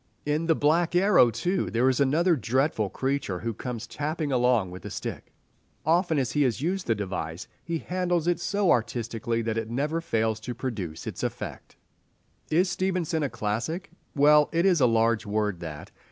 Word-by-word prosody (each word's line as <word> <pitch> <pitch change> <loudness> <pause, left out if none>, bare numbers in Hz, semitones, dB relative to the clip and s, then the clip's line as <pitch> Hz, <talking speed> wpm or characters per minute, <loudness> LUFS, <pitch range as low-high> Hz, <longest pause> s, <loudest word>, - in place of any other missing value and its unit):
In 150 +3 0
"The 165 - +4
Black 165 +4 +2
Arrow," 185 - +5
too, 175 - -1
there 120 +3 +2
is 130 0 +2
another 160 +6 +3
dreadful 130 -3 0
creature 135 -4 -2
who 115 0 -2
comes 120 +1 -5
tapping 150 0 -3
along 125 -7 +2
with 90 -1 -9
a - - -6
stick. - - -6 0.5
Often 165 0 +2
as 130 -3 0
he 150 - +1
has 125 -5 +1
used 180 +6 -2
the 115 - +2
device, 95 -4 -4 0.2
he 170 -1 -2
handles 180 -1 -1
it 175 -1 +1
so 200 +1 +1
artistically 115 0 -1
that 115 0 -1
it 115 0 -5
never 150 +7 -1
fails 110 -7 0
to 120 +2 -6
produce 105 -11 -5
its - - -5
effect. - - -5 0.7
Is 175 +5 +3
Stevenson 180 -2 -1
a 145 - 0
classic? 120 - -3 0.2
Well, 150 +1 +5
it 170 +2 +1
is 180 -6 +4
a 125 - +6
large 115 -1 +2
word 105 -3 -1
that. 75 -3 -8
135 Hz, 180 wpm, -27 LUFS, 115-165 Hz, 0.7 s, a